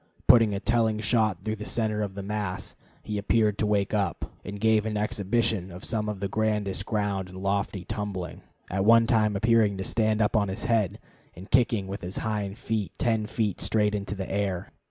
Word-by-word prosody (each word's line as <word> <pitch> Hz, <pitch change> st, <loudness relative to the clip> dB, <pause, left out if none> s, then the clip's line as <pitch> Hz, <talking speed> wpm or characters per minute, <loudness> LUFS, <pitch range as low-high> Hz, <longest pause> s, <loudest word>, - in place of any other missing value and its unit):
Putting 115 Hz, -4 st, +6 dB
a -, -, -2 dB
telling 115 Hz, 0 st, +2 dB
shot 110 Hz, -4 st, +1 dB
through 110 Hz, 0 st, -2 dB
the 105 Hz, -, -6 dB
center 110 Hz, -2 st, 0 dB
of 100 Hz, -2 st, -3 dB
the 100 Hz, -, -5 dB
mass, 100 Hz, -2 st, -4 dB, 0.3 s
he 105 Hz, -1 st, -3 dB
appeared 105 Hz, 0 st, +2 dB
to 105 Hz, -, +1 dB
wake 100 Hz, -1 st, +1 dB
up, 100 Hz, -6 st, 0 dB, 0.2 s
and 100 Hz, +1 st, -6 dB
gave 110 Hz, 0 st, +3 dB
an 105 Hz, -1 st, -2 dB
exhibition 105 Hz, -2 st, 0 dB
of 90 Hz, +2 st, -9 dB
some 110 Hz, -2 st, -1 dB
of 105 Hz, -2 st, -4 dB
the 100 Hz, -, 0 dB
grandest 105 Hz, -1 st, -1 dB
ground 100 Hz, -3 st, -1 dB
and 90 Hz, -, -10 dB
lofty 100 Hz, -1 st, -1 dB
tumbling, 100 Hz, -4 st, -4 dB, 0.3 s
at 95 Hz, +1 st, 0 dB
one 115 Hz, +2 st, +6 dB
time 110 Hz, -3 st, +2 dB
appearing 110 Hz, -1 st, +3 dB
to 95 Hz, -, -3 dB
stand 110 Hz, +1 st, +1 dB
up 105 Hz, +1 st, +2 dB
on 105 Hz, -2 st, +3 dB
his 95 Hz, +4 st, -4 dB
head 110 Hz, -6 st, +1 dB, 0.4 s
and 95 Hz, +4 st, -11 dB
kicking 115 Hz, -5 st, +3 dB
with 100 Hz, +2 st, -6 dB
his 90 Hz, 0 st, -5 dB
hind 105 Hz, -2 st, -2 dB
feet 110 Hz, -5 st, -2 dB
ten 110 Hz, -2 st, +1 dB
feet 105 Hz, -4 st, -1 dB
straight 105 Hz, -1 st, +1 dB
into 100 Hz, -1 st, -3 dB
the 95 Hz, -1 st, -4 dB
air. 95 Hz, -2 st, -2 dB
105 Hz, 200 wpm, -27 LUFS, 100-110 Hz, 0.4 s, Putting